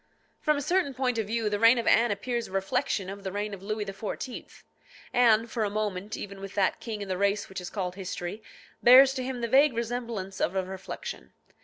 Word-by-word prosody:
From 300 -2 +2
a 285 - -2
certain 345 -5 +1
point 250 -2 0
of 215 - -2
view, 225 0 -1
the 205 -1 0
reign 230 +3 +6
of 235 - -1
Anne 235 +1 +5
appears 235 +4 -2
a - - -15
reflection 195 0 -1
of 195 +1 -7
the 190 - -3
reign 205 +1 -3
of 195 - -8
Louis 215 +1 -3
XIV. 205 +6 -6 0.5
Anne, 230 -3 +5
for 230 -1 -2
a 205 - 0
moment 205 -1 -3
even 200 -1 -7
with 195 0 -8
that 195 -2 +1
king 215 -3 -5
in - - -8
the 185 -1 -2
race 200 +1 +1
which 190 -1 -6
is 180 - -6
called 185 -4 -3
history, 185 +1 -5 0.4
bears 260 +2 +8
to 260 -1 -3
him 255 -1 -4
the 235 - 0
vague 275 +3 +5
resemblance 230 -5 -4
of 180 - 0
a 190 - +1
reflection. 190 0 -7
215 Hz, 220 wpm, -28 LUFS, 195-240 Hz, 0.5 s, bears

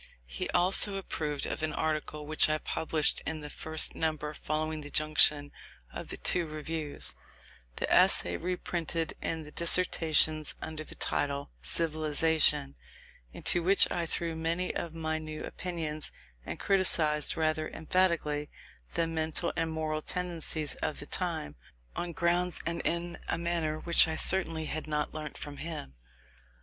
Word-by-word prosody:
He - - -5
also 190 +3 +3
approved 150 -6 -3
of - - -4
an 155 -1 -1
article 155 -1 -2
which 155 +1 +3
I 155 - +2
published 155 0 -1
in 160 -1 -4
the 150 0 -8
first 160 0 +3
number 155 -1 -2
following 155 +1 -3
the 145 - -9
junction 150 -1 +4 0.4
of - - -6
the - - -3
two 175 -2 +3
reviews, 155 0 -2 0.6
the - - -2
essay 85 - +5
reprinted 170 - -3
in 160 -1 -3
the 150 - -12
Dissertations, 160 -3 +2
under 155 -1 -6
the - - -10
title 140 - -2
"Civilization"; 155 - +2 0.6
into 175 - +2
which 190 +4 +4
I 170 -1 -1
threw 165 0 -1
many 165 +3 -1
of 165 -1 -4
my 160 -1 -2
new 155 -1 -7
opinions, 160 -4 -4 0.4
and - - -5
criticised 160 -6 +3
rather 155 -1 0
emphatically 160 -4 0 0.5
the 165 - +2
mental 160 +1 -1
and 165 -1 0
moral 155 -1 -2
tendencies 170 -4 -1
of 155 - -2
the - - -6
time, 160 - -3 0.4
on 175 -1 -3
grounds 175 +2 +1
and 170 0 -2
in 170 +1 -2
a - - 0
manner 170 -2 -1
which 170 +1 +4
I 160 - -2
certainly 165 -3 +4
had 155 +1 -5
not 150 -1 -2
learnt 155 -2 -6
from 145 -1 -7
him. 155 - -6
160 Hz, 145 wpm, -30 LUFS, 150-170 Hz, 0.6 s, essay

